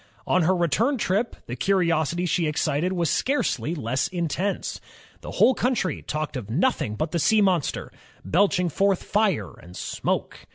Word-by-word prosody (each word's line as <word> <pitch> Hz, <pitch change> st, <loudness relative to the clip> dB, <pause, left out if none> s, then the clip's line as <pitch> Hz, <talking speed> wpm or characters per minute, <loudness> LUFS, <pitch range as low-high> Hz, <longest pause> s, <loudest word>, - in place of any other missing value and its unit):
'*0n 180 Hz, -3 st, +3 dB
her 185 Hz, -, +3 dB
return 205 Hz, -, +1 dB
trip, 210 Hz, +2 st, 0 dB
the 120 Hz, -, -5 dB
curiosity 170 Hz, +2 st, +1 dB
she 170 Hz, -1 st, +1 dB
excited 155 Hz, +3 st, 0 dB
was 175 Hz, -3 st, 0 dB
scarcely 210 Hz, -, 0 dB
less 130 Hz, -2 st, -1 dB
intense, 175 Hz, +2 st, -2 dB, 0.2 s
— -, -, -26 dB
the -, -, -8 dB
whole 260 Hz, -, +4 dB
country 245 Hz, -7 st, -1 dB
talked 155 Hz, -1 st, -4 dB
of 115 Hz, -5 st, -5 dB
noth 175 Hz, -, +1 dB
ing 105 Hz, -, -2 dB
but 155 Hz, +6 st, -2 dB
the 170 Hz, -, 0 dB
sea 220 Hz, +7 st, +4 dB
monster, 185 Hz, -7 st, +1 dB, 0.3 s
belching 180 Hz, 0 st, +2 dB
forth 195 Hz, +3 st, +1 dB
fire 195 Hz, -, 0 dB
and 90 Hz, +1 st, -12 dB
smoke. -, -, -3 dB
175 Hz, 165 wpm, -24 LUFS, 150-195 Hz, 0.3 s, whole